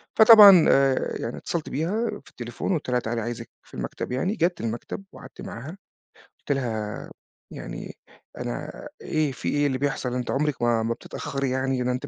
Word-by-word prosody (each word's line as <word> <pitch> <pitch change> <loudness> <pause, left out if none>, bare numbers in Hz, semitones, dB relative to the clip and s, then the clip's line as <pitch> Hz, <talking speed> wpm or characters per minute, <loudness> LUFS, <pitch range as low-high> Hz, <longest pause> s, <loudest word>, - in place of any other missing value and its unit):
فطبعًا 210 -6 +10
آآ، 135 -1 +2
يعني 115 - -4
اتصلت 170 -3 -4
بيها 195 - -1 0.2
في - - -15
التليفون 120 +8 -5
وقُلت 160 -7 -1
لها 125 0 +2
تعالي 115 0 -3
عايِزِك 120 +1 -5
في - - -24
المكتب، - - -5
يعني 185 +12 -1
جات 175 -4 0
المكتب 115 - -4
وقعدت 130 -8 -12
معاها، 120 +6 -7 0.7
قُلت - - -3
لها 110 -6 -3 0.4
يعني - - -7 0.4
أنا - - -6
إيه 155 -3 0
فيه 125 - -3
إيه 145 0 +2
اللي 130 -2 -1
بيحصل؟ 135 -2 -2
أنتِ 125 -1 -2
عمرك 145 -2 -1
ما 120 -1 +2
ما 115 +1 -1
بتتأخري 135 +3 -4
يعني، 130 0 0
ده 125 - +1
أنتِ 125 +3 -4
130 Hz, 175 wpm, -25 LUFS, 120-155 Hz, 0.7 s, فطبعًا